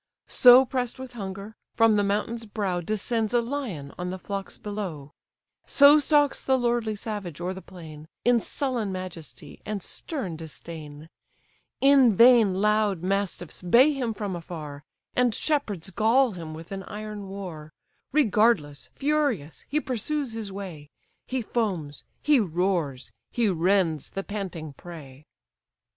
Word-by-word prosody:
So 250 +1 +7
press'd 250 -1 -2
with 260 -1 -9
hunger, 200 0 -7 0.2
from 225 -1 +5
the 205 - +2
mountain's 215 +3 -2
brow 195 -4 -2
Descends 215 +4 -1
a - - +5
lion 230 - -5
on 180 0 -3
the 185 - -4
flocks 195 +1 -6
below; 185 -9 -6 0.5
So 285 +2 +7
stalks 290 -1 +2
the 265 -1 +3
lordly 235 -3 0
savage 205 -7 -6
o'er 180 +2 -2
the 190 - -9
plain, 160 -5 -11 0.2
In 240 -1 +5
sullen 245 -5 -2
majesty, 185 -4 -8
and 210 -3 -4
stern 215 - -4
disdain: 155 -1 -9 0.7
In 270 -5 +6
vain 230 -4 +6
loud 210 -2 +1
mastiffs 195 -3 -2
bay 240 - +5
him 245 -5 -2
from 205 -3 -3
afar, 155 -4 -8 0.3
And 245 -3 +2
shepherds 210 - -1
gall 235 +6 +3
him 165 -4 -7
with 165 +3 -11
an 195 0 -4
iron 210 -1 -7
war; 175 -6 -7 0.4
Regardless, 210 - +2
furious, 280 - -1
he 300 - +1
pursues 270 0 -2
his 220 -3 -5
way; 180 -7 -8 0.4
He 260 -2 -2
foams, 185 -12 -2 0.2
he 295 -3 +5
roars, 175 - -1 0.2
he 235 -3 +1
rends 175 -3 +1
the 195 - -4
panting 180 -8 -5
prey. 150 -3 -12
200 Hz, 140 wpm, -26 LUFS, 175-240 Hz, 0.7 s, So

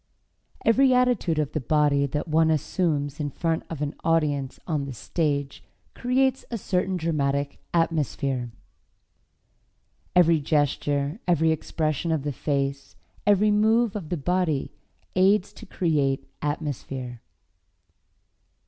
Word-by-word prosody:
Every 255 +3 +5
attitude 245 -10 +2
of 150 -2 0
the 155 - -1
body 145 +1 +2
that 150 +4 -3
one 160 0 +3
assumes 150 -2 0
in 145 -1 -1
front 165 +3 -1
of 150 -3 -4
an 145 +1 -2
audience 145 -5 0
on 150 -5 -1
the 135 - -6
stage 140 +1 -2 0.3
creates 260 +1 +1
a 235 - -3
certain 185 -1 -1
dramatic 140 -4 -1
atmosphere. 140 -6 0 1.7
Every 170 -2 +5
gesture, 145 - 0
every 160 -2 +3
expression 160 +1 -1
of 155 -4 0
the 145 -1 -2
face, 140 0 -2 0.3
every 205 +1 +4
move 220 +1 +3
of 180 -7 -5
the 175 - -1
body 165 -2 0 0.4
aids 190 +1 +3
to - - -12
create 140 -7 0
atmosphere. 135 -5 -4
155 Hz, 120 wpm, -25 LUFS, 140-180 Hz, 1.7 s, Every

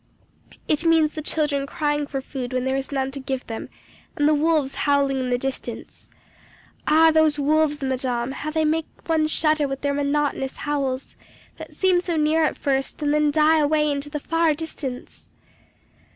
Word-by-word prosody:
It 305 +1 +1
means 325 -2 +3
the 310 - -5
children 295 -2 0
crying 295 -2 -1
for 270 -2 -4
food 260 -1 -6
when 255 0 -1
there 265 0 0
is 270 +1 -3
none 270 -1 -1
to 275 - -5
give 265 -1 -4
them, 225 -1 -6 0.5
and 295 - +3
the 305 - +4
wolves 300 -2 +1
howling 280 -2 +1
in 255 -1 -2
the 245 - +1
distance. 265 +1 -6 0.8
Ah! 320 +1 +6
those 315 -1 +3
wolves, 295 0 +1
madame, 255 -2 -1
how 305 +3 -5
they 315 0 0
make 315 +1 0 0.2
one 320 -2 +2
shudder 310 -1 +2
with 270 0 -5
their 285 0 0
monotonous 285 -1 -1
howls, 275 -3 -3 0.4
that - - -10
seem 370 -2 +3
so 350 -2 -2
near 310 +1 +2
at 310 - 0
first, 270 -1 -1
and 290 0 +1
then 300 0 +3
die 310 +2 +4
away 300 0 +2
into 285 +1 -3
the 295 0 -4
far 330 +1 +1
distance! 285 -5 -7
295 Hz, 180 wpm, -23 LUFS, 270-310 Hz, 0.8 s, Ah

